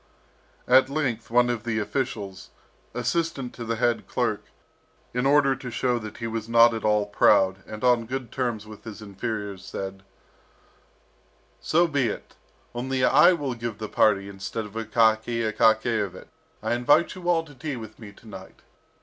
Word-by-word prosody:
At 130 +1 +5
length 130 -6 -2
one 120 +1 +4
of 120 -3 -2
the 115 -1 -2
officials, 105 -4 -3 0.5
assistant 135 0 -2
to 120 - -7
the 115 0 -2
head 120 0 0
clerk, - - -1 0.7
in 125 +2 +1
order 140 -1 +4
to 125 - -8
show 125 0 0
that 110 -2 -8
he 115 - -5
was 115 -1 -4
not 115 0 +6
at 110 - -4
all 105 -1 +2
proud, 95 -2 +3
and 110 +1 -8
on 120 -2 +3
good 130 -2 -5
terms 120 -5 -2
with 105 -1 -12
his 110 -1 -9
inferiors, 100 -1 -5
said: 95 0 -6 1.6
"So 170 +2 +3
be 140 -6 +1
it, 105 - -6 0.4
only 130 +1 -2
I 150 +8 +6
will 145 -6 -2
give 115 -2 -5
the 110 - -5
party 100 -2 +2
instead 100 +3 -5
of 105 - -11
Akaky 115 +1 +1
Akakiyevich; 110 -3 +1 0.3
I - - 0
invite 135 +8 +3
you 180 -1 -5
all 165 -2 +3
to 145 - -14
tea 145 +2 -5
with 110 -2 -10
me 105 -3 -10
to 105 - -18
night. 95 -3 -12
115 Hz, 165 wpm, -25 LUFS, 105-130 Hz, 1.6 s, not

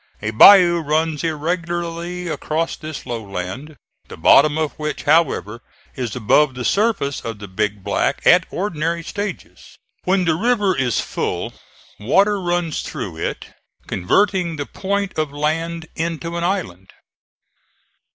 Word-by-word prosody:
A 110 +1 -3
bayou 175 - +8
runs 155 0 -1
irregularly 170 +2 -3
across 160 0 -2
this 155 -2 -8
low 120 -2 -4
land, 100 +10 -6 0.3
the - - -10
bottom 150 0 +5
of 155 -2 0
which, 150 0 -4
however, 140 -8 +1 0.3
is 120 -5 -4
above 130 +4 +3
the 125 -1 -4
surface 200 - +1
of 115 -2 -5
the 100 0 -9
Big 100 +1 -2
Black - - 0
at 180 -1 +5
ordinary 170 -3 -2
stages. 205 +4 -7 0.3
When 185 0 +1
the 165 - +3
river 205 0 +1
is 125 -4 0
full - - -3 0.5
water 195 - +2
runs 175 -3 -1
through 100 - -6
it, - - -5 0.3
converting 175 - +1
the 145 -1 -4
point 200 0 -3
of 155 -2 -1
land 160 +3 -2
into 165 +1 -3
an 170 - -2
island. 170 - -3
160 Hz, 135 wpm, -20 LUFS, 130-175 Hz, 0.5 s, bayou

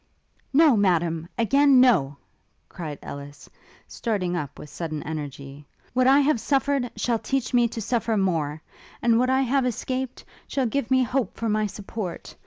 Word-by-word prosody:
'No, 295 -1 +6
Madam! 170 -5 +1
again 275 +3 +5
no!' 180 - +4 0.5
cried 155 -5 -6
Ellis, 145 0 -9 0.4
starting 195 -7 -2
up 145 -4 -5
with - - -9
sudden 155 -3 -5
energy: 145 -2 -7 0.3
'What 255 +1 +3
I 275 +2 +6
have 285 -3 +2
suffered 275 -1 0
shall 235 -2 0
teach 270 +1 -2
me 240 -1 +4
to 230 0 -6
suffer 230 -1 0
more, 160 -6 -1 0.4
and 235 -1 +4
what 255 +1 +2
I 265 +1 +3
have 270 +1 +1
escaped, 255 +1 -3 0.2
shall 270 -2 -1
give 240 +1 -1
me 260 -1 +4
hope 255 +1 -2
for 230 - -2
my 215 0 +1
support! 195 -2 -7
225 Hz, 160 wpm, -25 LUFS, 165-260 Hz, 0.5 s, No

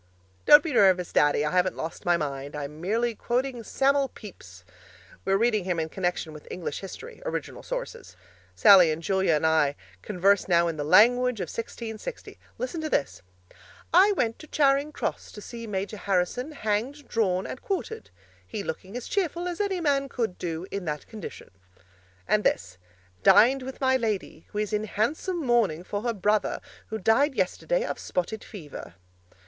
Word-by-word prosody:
Don't 295 0 +9
be 320 - -3
nervous, 185 -5 +4
Daddy 145 0 +3
I 150 - -1
haven't 180 0 +2
lost 165 +2 -6
my 175 -1 +4
mind; 140 -2 -4
I'm 150 +1 -6
merely 230 +6 0
quoting 245 +2 -2
Sam'l 275 +4 +2
Pepys. 90 - -13 0.6
We're 195 0 +3
reading 220 -2 +2
him 180 -3 -1
in 160 0 -2
connection 175 -3 -2
with 150 - -12
English 175 -5 -4
History, 455 - -9
original - - -4
sources. - - -6 0.4
Sallie 190 -6 +7
and 160 +2 -4
Julia 190 -1 +2
and 150 - 0
I 155 -3 +3 0.3
converse 195 - +2
now 170 -2 +4
in 165 - -2
the 145 - -2
language 235 +8 +5
of 180 -4 -3
1660. 230 - -7 0.2
Listen 360 -10 -4
to 310 - -3
this: 140 - -1 0.7
'I 385 +4 +6
went 230 - -1
to 310 - -11
Charing 285 0 +2
Cross - - -4
to - - -9
see 230 +2 -8
Major 200 +1 -3
Harrison 200 - -1
hanged, 240 +4 -2
drawn 190 -5 0
and 260 - -7
quartered: 445 +3 -4 0.4
he 215 -3 -5
looking 190 +6 -6
as 245 - -7
cheerful 350 -2 -1
as 350 +2 -3
any 390 -3 -1
man 275 -3 +1
could 225 -9 -3
do 165 0 -4
in 200 -2 -4
that 150 -2 -4
condition.' 215 -5 -9 0.8
And 210 0 +2
this: 90 +2 -1 0.4
'Dined 255 - +6
with 260 +1 -7
my 260 -1 +3
lady 220 -5 -3
who 210 - -8
is 210 -1 -1
in 210 +1 0
handsome 305 - -1
mourning 220 -10 +2
for 205 +2 -4
her 235 +1 -1
brother 210 +2 +1 0.3
who 220 - -4
died 255 +8 +2
yesterday 360 - 0
of - - -4
spotted 210 +5 -3
fever.' 150 - -10
215 Hz, 170 wpm, -26 LUFS, 180-265 Hz, 0.8 s, Don't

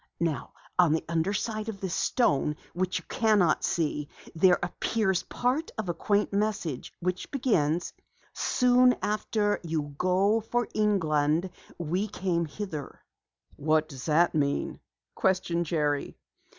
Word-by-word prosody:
"Now 165 -4 -2 0.3
on 170 -4 +6
the 160 - -1
underside 205 +6 -1
of 200 -3 -6
this 190 -2 -3
stone 150 - +1 0.2
which 185 +1 -1
you 170 - -7
cannot 210 -7 +2
see, 150 -3 -1 0.2
there 180 +2 +5
appears 190 +1 0
part 255 - -1
of 215 -5 -3
a - - +1
quaint 205 +4 0
message 200 -9 -1
which 180 +1 -2
begins: 175 - +1 0.4
'Soon 250 0 +4
after 210 0 0
you 155 -4 -3
goe 195 +4 +3
for 240 +2 -1
Englande 170 -5 +1 0.3
we 175 +5 -1
came 180 -4 -1
hither.'" 155 -2 -6 0.6
"What 155 +1 +2
does 135 +1 -7
it 170 +3 +4
mean?" 140 -2 0 0.3
questioned 175 -3 0
Jerry. 150 -3 -1
180 Hz, 125 wpm, -28 LUFS, 155-210 Hz, 0.6 s, on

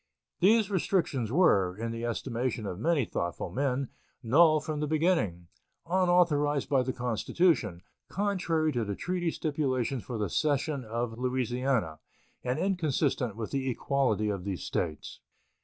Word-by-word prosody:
These 210 +2 +4
restrictions 160 - 0
were, 100 - +3
in 115 +1 -3
the 115 +1 -4
estimation 120 -1 -2
of 95 -2 -5
many 150 0 +2
thoughtful 85 -5 -3
men, 135 -1 -1 0.3
null 155 +6 +5
from 155 0 -4
the 150 - -1
beginning, 155 - +1 0.4
unauthorized 170 -5 +2
by 135 -2 +3
the 130 +1 -1
Constitution, 120 - 0 0.3
contrary 175 -6 0
to 120 -4 -1
the 100 -2 -3
treaty 180 - -1
stipulations 135 -6 -1
for 120 - -5
the 105 -2 -1
cession 145 - 0
of 115 +1 -4
Louisiana, 125 - -1 0.4
and 125 +2 -1
inconsistent 155 - 0
with 110 -1 -5
the 135 -1 -1
equality 125 -5 0
of 100 -3 -3
these 95 -7 -4
States. 80 -4 -3
130 Hz, 140 wpm, -29 LUFS, 115-155 Hz, 0.4 s, null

